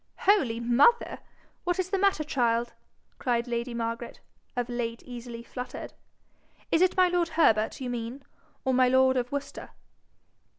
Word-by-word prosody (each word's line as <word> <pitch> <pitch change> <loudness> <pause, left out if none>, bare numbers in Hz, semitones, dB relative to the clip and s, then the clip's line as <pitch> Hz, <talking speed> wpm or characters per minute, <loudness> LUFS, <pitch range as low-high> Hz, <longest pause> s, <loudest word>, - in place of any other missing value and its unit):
'Holy 280 - +3
mother! 250 - +3 0.4
what 355 -1 0
is 370 0 -2
the 395 - +2
matter, 390 -5 +2
child?' 240 -5 0 0.5
cried 240 -2 0
lady 235 +1 -2
Margaret, 230 +1 -4 0.4
of 245 -1 -1
late 235 -1 -4
easily 240 -1 -8
fluttered. 250 +2 -7 0.8
'Is 325 - +3
it 370 0 +3
my 370 -1 +6
lord 350 -1 +1
Herbert 220 -11 +2
you 260 - -4
mean, 240 +3 -5 0.4
or 260 - +2
my 255 0 +5
lord 260 +1 +4
of 250 -1 -1
Worcester?' 285 0 -5
250 Hz, 145 wpm, -28 LUFS, 235-310 Hz, 0.8 s, my